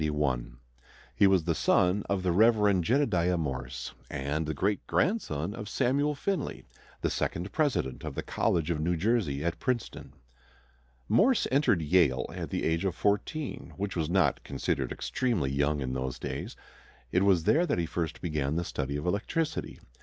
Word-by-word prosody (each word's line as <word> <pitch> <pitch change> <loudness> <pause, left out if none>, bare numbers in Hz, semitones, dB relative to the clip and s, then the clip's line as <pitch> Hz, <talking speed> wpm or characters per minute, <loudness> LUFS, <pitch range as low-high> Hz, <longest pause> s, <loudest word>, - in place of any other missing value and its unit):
He 100 - +5
was 95 -3 +3
the 85 0 +1
son 90 +4 +3
of 100 -2 0
the 90 - +2
Rev. 105 -1 +4
Jedediah 90 - +2
Morse, 65 -5 -4 0.2
and 75 +3 -2
the 80 - -1
great 100 +7 -1
grandson 100 - 0
of 105 -2 -7
Samuel 145 +6 +1
Finley, 185 +1 -3 0.4
the - - 0
second 90 +4 -2
president 140 - 0
of - - -5
the - - -3
College 85 0 0
of 80 - -1
New 85 +2 0
Jersey 85 - 0
at 85 +1 -1
Princeton. 125 -3 -3 0.9
Morse 245 +3 +4
entered 130 - +3
Yale 75 -6 +3
at - - -5
the - - -2
age 80 +2 +1
of 95 -3 -1
fourteen, 105 +9 -2
which 100 0 -3
was 80 -3 -1
not 85 -7 +2
considered - - -2
extremely 110 - -1
young 70 +1 +1
in 65 -1 -2
those 65 0 -3
days. - - -5 0.6
It 90 - +3
was 95 -4 +4
there 170 - +3
that - - 0
he 85 - 0
first 85 -1 -3
began 75 -3 -1
the 85 - 0
study 70 -4 -3
of 75 - -5
electricity. 150 - -2
90 Hz, 165 wpm, -29 LUFS, 75-110 Hz, 0.9 s, He